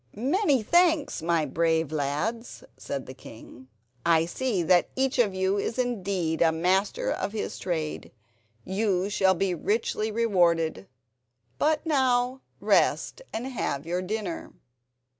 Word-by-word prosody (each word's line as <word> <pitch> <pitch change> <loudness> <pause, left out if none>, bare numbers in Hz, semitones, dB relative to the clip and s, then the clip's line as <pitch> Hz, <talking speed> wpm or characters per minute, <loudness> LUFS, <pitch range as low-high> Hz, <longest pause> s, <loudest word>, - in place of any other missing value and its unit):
"Many 275 - +1
thanks, 330 - +2
my 165 -1 +1
brave 160 +1 0
lads," 155 - -3
said 140 -2 -5
the 130 - -9
king; 130 0 -13 0.4
"I 165 -1 +3
see 205 0 -1
that 175 +2 +3
each 265 0 0
of 205 -6 +2
you 190 +2 +1
is 225 - -3
indeed 195 -9 -1
a 165 -1 +5
master 190 - 0
of 205 - -3
his 220 - -4
trade. 160 -4 -3 0.5
You 195 -1 0
shall 190 -2 +3
be 190 +1 0
richly 215 +4 -1
rewarded. 170 - +1 0.7
But 310 +1 +1
now 260 -3 +1 0.2
rest - - +1
and 225 +3 -4
have 190 - -3
your 175 +2 -1
dinner." 195 -2 -4
195 Hz, 130 wpm, -26 LUFS, 165-245 Hz, 0.7 s, a